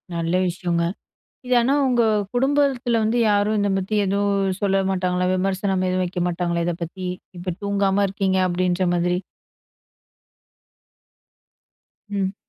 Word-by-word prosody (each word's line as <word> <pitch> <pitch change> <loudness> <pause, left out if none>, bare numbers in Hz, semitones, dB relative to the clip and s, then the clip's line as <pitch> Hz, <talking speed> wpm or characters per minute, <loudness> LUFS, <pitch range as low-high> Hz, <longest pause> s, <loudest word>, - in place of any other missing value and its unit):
நல்ல 170 +2 0
விஷயங்க. 175 -1 -1 0.6
இது 250 - +2
ஆனா 255 +4 +2
உங்க 245 -2 +3 0.3
குடும்பத்தில 265 -3 +2
வந்து, 220 +2 +1
யாரும் 205 +1 +2
இத 205 - +1
பத்தி 195 +3 -3
எதுவும் 200 -1 0
சொல்ல 195 -1 +2
மாட்டாங்களா? 180 -1 0
விமர்சனம் 190 0 0
எதுவும் 185 0 0
வைக்க 180 0 -4
மாட்டாங்களா, 170 -1 -1
இத 175 - 0
பத்தி? 185 +3 -7 0.3
இப்போ 180 +1 -3
தூங்காம 200 0 +1
இருக்கீங்க 190 -1 0
அப்படின்ற 180 +1 0
மாதிரி, 175 +1 +1 2.9
ம். 195 -1 -1
190 Hz, 120 wpm, -22 LUFS, 180-205 Hz, 2.9 s, உங்க